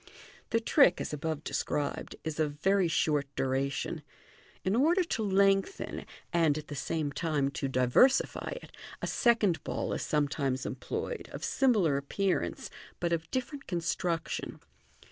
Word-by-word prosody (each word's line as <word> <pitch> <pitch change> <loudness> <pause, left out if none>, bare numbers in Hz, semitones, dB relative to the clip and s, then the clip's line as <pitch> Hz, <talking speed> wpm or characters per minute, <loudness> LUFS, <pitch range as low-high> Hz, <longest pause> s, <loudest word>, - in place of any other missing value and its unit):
The 230 - +2
trick, 230 - +4
as - - -4
above 155 0 -3
described, 145 -2 -2
is 160 -1 -4
of 150 -2 +1
very 195 +1 +3
short 150 -3 +1
duration. 135 +1 -1 0.6
In 190 - +1
ordei 330 - +3
to - - -1
lengthen, 195 - +1 0.3
and 160 -4 +3
at 155 - -7
the 145 - -5
same 150 +1 -2
time 145 -3 0
to 140 - -2
diversify 130 - +3
it, - - -13 0.3
a - - +2
second 210 - +2
ball - - -2
is - - -2
some 150 -1 +1
times 135 -2 -2
employed, 485 - -4
of - - -5
simi 260 -4 +3
lar 160 -8 +3
appearance, 185 +7 -1 0.3
but 170 -1 0
of 165 -1 -2
differ^ 260 +3 -2
nt 275 - -18
construction. 170 -1 -2
165 Hz, 150 wpm, -30 LUFS, 145-200 Hz, 0.6 s, trick